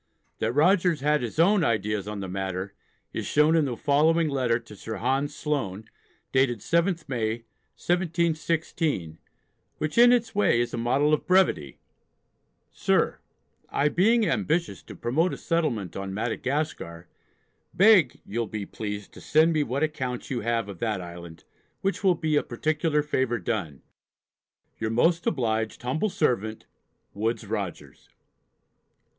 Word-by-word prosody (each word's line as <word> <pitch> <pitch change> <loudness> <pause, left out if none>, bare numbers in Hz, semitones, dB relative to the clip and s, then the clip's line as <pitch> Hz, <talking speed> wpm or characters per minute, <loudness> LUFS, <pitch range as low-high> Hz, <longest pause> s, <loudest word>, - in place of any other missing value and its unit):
That 110 +1 0
Rogers 170 +1 +3
had 150 +1 +2
his 120 +2 -5
own 185 +3 +4
ideas 105 -5 0
on 105 -1 -5
the 95 - -4
matter 95 +1 -4 0.4
is - - -3
shown 150 +2 +4
in 160 -3 +3
the 125 -4 -3
following 155 +4 +3
letter 130 -4 +1
to 105 - -13
Sir 110 +2 -6
Hans 135 +7 -1
Sloane, 110 -9 -3 0.5
dated 130 -2 +2
7th 170 - 0
May, 115 -2 -2 0.3
1716, 165 - -1 0.6
which 155 +8 -1
in 240 0 +8
its 235 -2 +2
way 200 - +3
is 120 0 -1
a - - -2
model 135 +6 +2
of 155 - 0
brevity: 180 - +2 0.9
SIR, - - +1 0.5
I 145 +1 +1
being 220 +7 +3
ambitious 125 - 0
to - - -11
promote 150 +10 0
a - - -11
settlement 120 - -1
on 95 0 -5
Madagascar, 120 - -3 0.6
beg 190 - +5
you'll 115 +2 -2
(be) 105 0 -5
pleased 105 0 -6
to - - -12
send 160 +2 +3
me 155 - +2
what 140 +1 -1
accounts 130 -6 -3
you 125 - -1
have 115 0 -1
of 100 -4 -9
that 110 -4 -1
island, 85 -2 -10 0.4
which 195 +2 -1
will 185 -2 +4
be 155 -2 -1
a 145 - +4
particular 155 +4 0
favour 130 -5 0
done 100 - -4 1.0
Your 110 - -1
most 165 +9 +2
obliged 110 -6 -1
humble 155 +12 0
servant, 110 - -1 0.5
WOODES 115 +2 -2
ROGERS. - - -6
130 Hz, 145 wpm, -26 LUFS, 110-160 Hz, 1.0 s, in